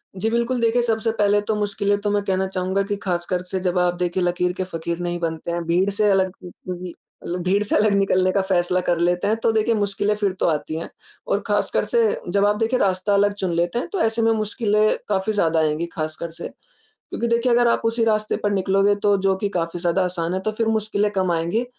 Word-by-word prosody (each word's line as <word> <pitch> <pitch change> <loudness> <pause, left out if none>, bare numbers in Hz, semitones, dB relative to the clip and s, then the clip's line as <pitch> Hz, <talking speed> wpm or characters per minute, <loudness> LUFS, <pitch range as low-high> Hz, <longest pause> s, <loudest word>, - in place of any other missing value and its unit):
जी, 215 +4 -1
बिल्कुल। 235 +2 0
देखिए 230 +1 +3
सबसे 225 -1 0
पहले 205 0 +3
तो 220 - +1
मुश्किलें 205 -1 0
तो 205 - -1
मैं 205 -1 +1
कहना 190 -1 0
चाहूँगा 190 +1 -1
कि 205 +1 -2
ख़ासकर 180 -1 -1
से 190 +1 -3
जब 180 0 -1
आप 180 0 +2
देखिए 180 +1 -1
लकीर 180 0 0
के 185 - -3
फ़क़ीर 170 -1 -4
नहीं 175 0 -3
बनते 165 0 -3
हैं, 170 0 -2
भीड़ 180 +4 +2
से 210 +1 +1
अलग 190 -1 +2
खुद 180 -1 -13
से 185 - -7
भी 180 -1 -7 0.3
मतलब 175 +1 -3
भीड़ 200 +3 +2
से 210 - -1
अलग 210 0 +3
निकलने 185 -2 +2
का 195 - +1
फ़ैसला 185 -1 +1
कर 175 -1 0
लेते 175 +2 +1
हैं 215 - +2
तो 230 - +4
देखिए 220 +1 +1
मुश्किलें 205 0 0
फिर 205 -2 0
तो - - +1
आती 155 -1 -1
हैं। - - -7 0.4
और - - +1
ख़ासकर - - 0
से 475 - +2 0.3
जब 200 0 +3
आप 205 0 +3
देखिए 230 +3 0
रास्ता 190 +1 +1
अलग 205 0 +3
चुन 190 -3 -2
लेते 170 +6 0
हैं - - -4
तो 390 - -1
ऐसे 225 +1 +1
में 225 0 +3
मुश्किलें 215 -1 +1
काफ़ी 200 +2 0
ज़्यादा 165 -5 +2
आएँगी 155 +1 0
ख़ासकर 155 +1 -4
से। 165 - -7 0.4
क्योंकि 235 - -5
देखिए 235 +1 +1
अगर 240 0 +4
आप 235 - +2
उसी 230 +1 +1
रास्ते 215 -1 +1
पर 205 - +1
निकलोगे 195 +1 +2
तो 205 -1 +4
जो 195 0 +2
कि 205 0 -2
काफ़ी 175 -2 -3
ज़्यादा 175 +2 +1
आसान 175 -1 -2
है 185 - -1
तो 215 - -1
फिर 225 +1 -1
मुश्किलें 210 -1 0
कम 185 -3 0
आएँगी। 170 +9 0
195 Hz, 235 wpm, -22 LUFS, 180-215 Hz, 0.4 s, तो